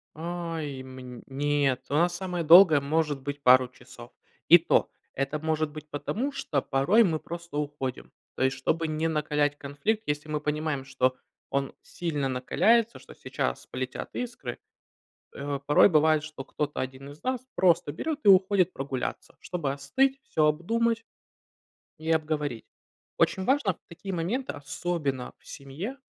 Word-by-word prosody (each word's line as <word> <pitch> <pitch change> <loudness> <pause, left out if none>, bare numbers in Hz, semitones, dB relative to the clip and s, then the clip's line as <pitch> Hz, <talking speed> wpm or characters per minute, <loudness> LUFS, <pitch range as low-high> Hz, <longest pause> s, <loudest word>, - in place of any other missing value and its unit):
Ай, 165 -4 -4
мн 130 -2 -10
нет, 140 -1 0
у - - -4
нас 175 +4 +3
самое 180 -2 -3
долгое, 165 -2 +8
может 145 -1 0
быть, 145 +1 -5
пару 130 -1 +6
часов. 125 -1 -14 0.4
И - - +11
то, - - +2 0.2
это 135 +3 -2
может 155 0 0
быть 155 0 -10
потому, 205 - -2
что 145 - -1
порой 180 +13 +3
мы 165 -6 +1
просто 170 -2 -8
уходим. 145 -3 -4 0.2
То - - -1
есть, 130 0 +1
чтобы 160 +5 0
не 155 +1 0
накалять 150 -2 0
конфликт, 145 +11 -2
если 150 +1 -2
мы 150 -1 -2
понимаем, 150 -2 -2
что 130 -1 +1 0.3
он 140 0 -1
сильно 150 -5 -3
накаляется, 220 - +2
что - - -14
сейчас - - -3
полетят - - -5
искры, 235 - -5 0.7
э, 140 0 -4
порой 145 +7 +6
бывает, 155 -2 +4
что 155 -3 -8
кто-то 145 +2 -3
один 130 +2 -5
из 145 - -14
нас 255 -1 -1
просто 175 -5 +3
берёт 300 - -3
и - - +2
уходит 190 -1 +5
прогуляться, 135 -2 -4
чтобы 160 -6 -3
остыть, 265 - +1
всё 155 -1 +1
обдумать 230 +9 +1 1.0
и 160 +1 -4
обговорить. 150 -6 -1 0.5
Очень 190 - +2
важно 260 -8 +2
в - - -35
такие 190 +3 -7
моменты, 200 +11 -2
особенно 145 -2 -3
в - - -27
семье- 160 - -6
150 Hz, 150 wpm, -27 LUFS, 140-175 Hz, 1.0 s, И